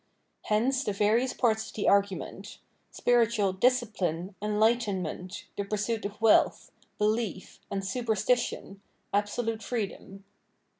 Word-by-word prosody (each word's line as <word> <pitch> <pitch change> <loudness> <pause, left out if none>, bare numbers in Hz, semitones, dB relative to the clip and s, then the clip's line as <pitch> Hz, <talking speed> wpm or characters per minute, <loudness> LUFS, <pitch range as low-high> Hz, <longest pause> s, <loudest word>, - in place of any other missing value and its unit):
Hence 255 +6 +1
the 205 - -1
various 215 +6 +2
parts 220 -2 +1
of - - -12
the 210 - -1
argument 200 -1 0 0.3
.—spiritual 230 -5 +2
" 190 - -15
dis 250 +3 +4
cipline," 185 -4 -3
"enlightenment," 210 -4 0
the 200 - -2
pursuit 210 +2 -2
of 205 +1 -6
"wealth," 225 -1 +3 0.3
"belief" 210 -2 -1
and 195 -1 -3
"super 230 +2 -1
stition," 210 -2 -1 0.2
" - - -44
absolute 220 +2 -1
freedom." 200 -4 -5
210 Hz, 130 wpm, -28 LUFS, 200-230 Hz, 0.3 s, dis